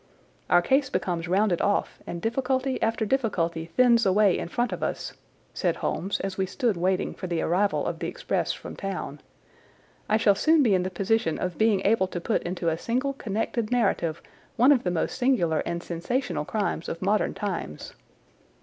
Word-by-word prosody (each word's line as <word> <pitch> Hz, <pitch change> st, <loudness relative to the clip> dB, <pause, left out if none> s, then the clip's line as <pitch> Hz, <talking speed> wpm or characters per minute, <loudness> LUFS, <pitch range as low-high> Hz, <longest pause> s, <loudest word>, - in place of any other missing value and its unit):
"Our 175 Hz, 0 st, +5 dB
case 265 Hz, +7 st, +2 dB
becomes 175 Hz, -6 st, -2 dB
rounded 190 Hz, 0 st, +2 dB
off, 205 Hz, -, 0 dB
and 170 Hz, 0 st, -6 dB
difficulty 260 Hz, +3 st, 0 dB
after 225 Hz, 0 st, +1 dB
difficulty 175 Hz, -10 st, -1 dB
thins 235 Hz, +6 st, +4 dB
away 195 Hz, -1 st, +4 dB
in -, -, -3 dB
front 240 Hz, +7 st, -1 dB
of -, -, -5 dB
us," -, -, -3 dB, 0.4 s
said -, -, 0 dB
Holmes 195 Hz, +3 st, -2 dB
as 195 Hz, 0 st, -4 dB
we 190 Hz, -, +1 dB
stood 230 Hz, +2 st, 0 dB
waiting 185 Hz, +2 st, 0 dB
for 185 Hz, -, -6 dB
the 170 Hz, -2 st, -1 dB
arrival 195 Hz, +4 st, +1 dB
of -, -, -3 dB
the -, -, -3 dB
express -, -, -1 dB
from -, -, -8 dB
town. 185 Hz, -7 st, -5 dB, 0.9 s
"I 215 Hz, -, +4 dB
shall 210 Hz, -2 st, +4 dB
soon 310 Hz, +9 st, +4 dB
be 220 Hz, -6 st, +3 dB
in 185 Hz, -, +3 dB
the 185 Hz, -, -2 dB
position 190 Hz, -2 st, 0 dB
of 180 Hz, -1 st, -4 dB
being 215 Hz, -3 st, +3 dB
able 200 Hz, -2 st, +3 dB
to 180 Hz, -, -5 dB
put 215 Hz, +6 st, 0 dB
into 175 Hz, -1 st, -3 dB
a 160 Hz, 0 st, -2 dB
single 255 Hz, +6 st, -1 dB
connected 225 Hz, -1 st, -2 dB
narrative 195 Hz, -9 st, 0 dB, 0.3 s
one 250 Hz, +5 st, +5 dB
of 265 Hz, -4 st, +4 dB
the 180 Hz, -, 0 dB
most 175 Hz, +7 st, -2 dB
singular 230 Hz, -12 st, +2 dB
and 170 Hz, 0 st, -3 dB
sensational 175 Hz, -, -2 dB
crimes 200 Hz, -3 st, -2 dB
of 165 Hz, -, -5 dB
modern 205 Hz, +2 st, +1 dB
times. 185 Hz, -, -5 dB
200 Hz, 185 wpm, -26 LUFS, 175-235 Hz, 0.9 s, Our